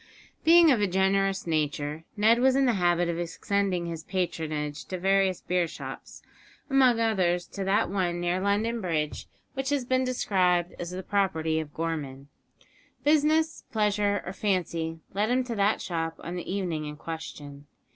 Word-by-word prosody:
Being 335 -1 +7
of 235 -5 +2
a 205 - +3
generous 195 +1 +1
nature, 150 -1 -2
Ned 220 +3 +4
was 260 +1 +4
in 275 0 +3
the 245 - +3
habit 175 -2 +2
of 170 0 -2
extending 180 +1 -1
his 165 -2 -5
patronage 155 -5 -3
to 185 - -4
various 190 0 +2
beer 180 -1 0
shops, - - -9 0.5
among 255 -4 +5
others 185 -6 +1
to 200 - -5
that 195 +2 +2
one 180 -2 -1
near 175 +1 0
London 215 +4 0
Bridge 155 -5 -2 0.3
which 270 0 -2
has 285 -3 0
been 255 +1 +1
described 185 -8 +1
as 175 - -4
the 185 +1 -6
property 160 -6 0
of 155 -2 -6
Gorman. 145 -4 -4 0.7
Business, 310 +1 +2
pleasure, 210 -2 +1
or 185 - -5
fancy 170 -5 -1
led 205 +3 0
him 255 +1 +2
to 245 -2 -4
that 200 +1 +2
shop 165 -2 -3
on 175 - -5
the 180 0 -5
evening 175 -6 -2
in 150 0 -6
question. 145 -3 -8
185 Hz, 165 wpm, -27 LUFS, 165-210 Hz, 0.7 s, Being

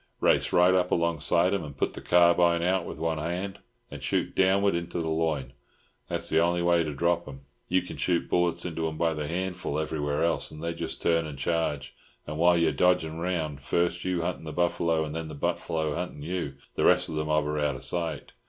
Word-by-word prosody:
"Race - - +2
right 90 +1 +5
up 90 -1 +2
alongside 85 +2 +2
'em, 100 -4 -1
and 70 -3 -9
put - - 0
the - - -8
carbine 85 -1 +4
out 95 +2 +1
with - - -7
one 80 0 -1
hand, 90 +5 -3 0.3
and - - -8
shoot - - -1
downwards 95 0 +3
into 85 0 -3
the 80 - -2
loin. 80 -5 -1 0.6
That's - - -1
the - - +3
only 85 0 +1
way 85 -1 +4
to 75 - -3
drop 85 +3 +1
'em. 70 -2 -9 0.3
You 90 0 +2
can 90 - -8
shoot 85 -2 0
bullets 85 -1 +1
into 80 -2 -2
'em 80 -1 -5
by 85 0 +1
the 75 -1 -4
hatful 90 -2 -3
everywhere 75 -2 -1
else, 85 0 +1
and 75 +1 -10
they 85 0 -1
just 85 -1 -5
turn 85 -1 +2
and 75 -2 -8
charge; 75 -1 -1 0.3
and 75 +1 -5
while 85 +1 +5
you 85 -1 +3
are - - -1
dodging 80 +1 +1
round, 80 -5 -2
first 85 +4 0
you 90 -2 -1
huntin' 90 -1 -3
the 80 - -5
buffalo, 85 -2 +1
and 75 - -6
then 80 0 -4
the 75 - -8
buffalo 80 +2 -1
huntin' 85 -2 -5
you, 80 -4 -3 0.2
the - - -1
rest - - +4
of - - -6
the 75 0 -1
mob 75 -1 +1
are 75 0 -1
out 75 -2 0
of 65 - -9
sight. 80 -2 -3
85 Hz, 225 wpm, -27 LUFS, 75-85 Hz, 0.6 s, right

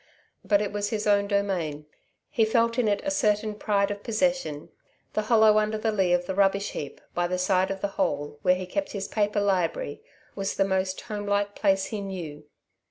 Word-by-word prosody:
But 205 0 +3
it 205 - -3
was 205 0 -1
his 215 -1 -2
own 200 -1 +3
domain. 185 -7 -1 0.5
He 225 - +3
felt 230 +2 +2
in 235 - +2
it 205 -1 +1
a 290 - -1
certain 215 -6 +1
pride 205 -1 0
of 205 0 -5
possession. 225 - -1 0.4
The 215 - +1
hollow 220 -2 +6
under 215 0 0
the 220 +1 0
lee 190 -4 +1
of 175 0 +2
the 190 - -3
rubbish 200 +1 +2
heap, 145 - -6
by 175 0 0
the 180 +1 -1
side 185 0 +2
of 195 0 -4
the - - +1
hole 145 0 -1
where 180 +3 +4
he 185 0 -4
kept 290 +11 -3
his 200 -1 -3
paper 210 -1 0
library, 180 -7 0 0.3
was 195 -1 -3
the 195 - +2
most 190 -1 -1
homelike 205 -1 -1
place 195 -2 +2
he 210 0 -4
knew. 165 -7 -6
200 Hz, 200 wpm, -26 LUFS, 185-215 Hz, 0.5 s, hollow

